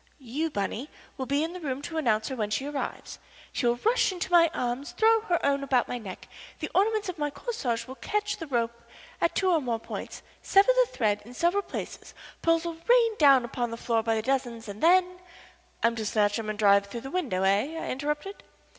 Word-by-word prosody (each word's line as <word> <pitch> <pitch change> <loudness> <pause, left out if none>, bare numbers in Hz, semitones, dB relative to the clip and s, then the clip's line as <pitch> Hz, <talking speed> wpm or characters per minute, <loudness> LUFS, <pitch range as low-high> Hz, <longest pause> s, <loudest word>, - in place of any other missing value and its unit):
You, 285 +5 -3
Bunny, 225 +4 -3 0.3
will 260 -3 -5
be 280 +2 +1
in 330 +2 -3
the 365 - -7
room 280 -4 -4
to 325 +1 -3
announce 220 -6 +1
her 265 - -4
when 215 -4 -2
she 210 +6 -1
arrives. 290 -1 -5 0.3
She 245 - 0
will 235 - +3
rush 475 +3 +3
to 355 - -3
my 335 -1 +6
arms, 250 +2 -3
throw 450 0 +4
her 355 -6 0
own 280 0 +1
about 260 -3 +2
my 245 - -4
neck, 195 -5 -9 0.3
the - - -5
ornaments 425 +1 +2
of 360 -3 -5
my 295 0 0
corsage 280 - -3
will 260 - -8
catch 415 +8 -2
the 325 - -7
rope 235 -3 0 0.5
at 335 - +1
two 375 -1 +2
or 325 -3 +3
more 240 -4 -1
points, - - -7 0.2
sever 395 +5 +5
the - - +2
thread 210 -3 0
in 240 +3 -13
several 350 +8 +2
places, - - -7 0.3
pearls 330 0 +2
will 335 -1 -4
rain 470 -2 +5
down 275 -5 +6
upon 240 0 -3
the 230 - -6
floor 230 -1 0
by 225 0 0
dozens, 240 -2 -2
and 205 +1 -8
then 360 +1 +4 0.3
" - - -24
"I'm 230 0 +3
to 220 - -2
snatch 205 0 +1
'em 215 -1 -4
and 215 - -3
dive 200 -1 +4
through 235 +3 -6
the 270 - -8
window, 260 - -1
eh?" 205 +12 +1
I - - -4
interrupted. 295 +8 -3
275 Hz, 220 wpm, -27 LUFS, 230-345 Hz, 0.5 s, my